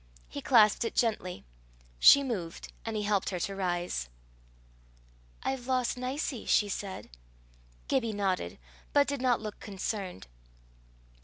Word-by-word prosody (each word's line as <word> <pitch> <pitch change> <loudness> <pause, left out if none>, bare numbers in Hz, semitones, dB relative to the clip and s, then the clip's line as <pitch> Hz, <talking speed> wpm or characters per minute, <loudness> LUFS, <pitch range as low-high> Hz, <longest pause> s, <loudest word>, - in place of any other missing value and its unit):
He - - -6
clasped 220 -3 +5
it 230 - -3
gently. 200 - 0 0.5
She 280 - +9
moved, 190 -11 -5
and 225 -1 -3
he 210 - -1
helped 205 -2 +1
her 180 - -3
to 195 - -2
rise. 175 - -2 1.3
"I've 260 -2 -2
lost 255 -2 +1
Nicie," 255 0 -3
she 205 - +3
said. 195 -1 -5 0.8
Gibbie 245 -5 +1
nodded, 190 - -1 0.4
but 285 0 +5
did 280 -2 -2
not 250 -3 +2
look 215 -1 -6
concerned. 195 - -4
210 Hz, 130 wpm, -30 LUFS, 190-250 Hz, 1.3 s, She